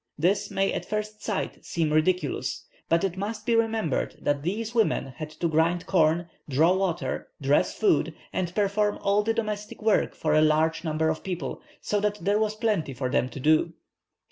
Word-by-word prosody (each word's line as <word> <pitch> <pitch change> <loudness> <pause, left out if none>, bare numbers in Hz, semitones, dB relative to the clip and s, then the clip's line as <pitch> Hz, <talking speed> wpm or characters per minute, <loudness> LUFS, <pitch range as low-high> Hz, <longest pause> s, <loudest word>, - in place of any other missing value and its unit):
This 195 +6 +1
may 195 0 0
at - - -2
first 215 0 -4
sight 210 -3 -3
seem 160 -3 -1
ridiculous, 155 -1 0 0.2
but 165 +2 +3
it 190 -1 -1
must 210 +1 -4
be 235 -1 +2
remembered 225 - 0
that 145 -1 0
these 215 +8 -3
women 220 - +1
had 155 - -5
to 170 +2 -2
grind 165 +2 +1
corn, 170 -2 +2 0.2
draw 160 +6 +4
water, 185 - -1
dress - - +2
food, 405 - +2 0.2
and 175 -1 -2
perform 205 0 +1
all 200 +1 +3
the 220 +2 0
domestic 210 -2 -3
work 215 -1 +2
for 155 -1 0
a 155 - +5
large 155 +2 +2
number 160 -1 0
of 155 - -2
people, 175 -8 -4 0.2
so 210 - 0
that 210 0 0
there 200 +4 +1
was 215 -1 0
plenty 210 - -1
for 130 0 -2
them 125 - +1
to 135 - -8
do." 155 +4 +3
180 Hz, 185 wpm, -26 LUFS, 155-210 Hz, 0.2 s, a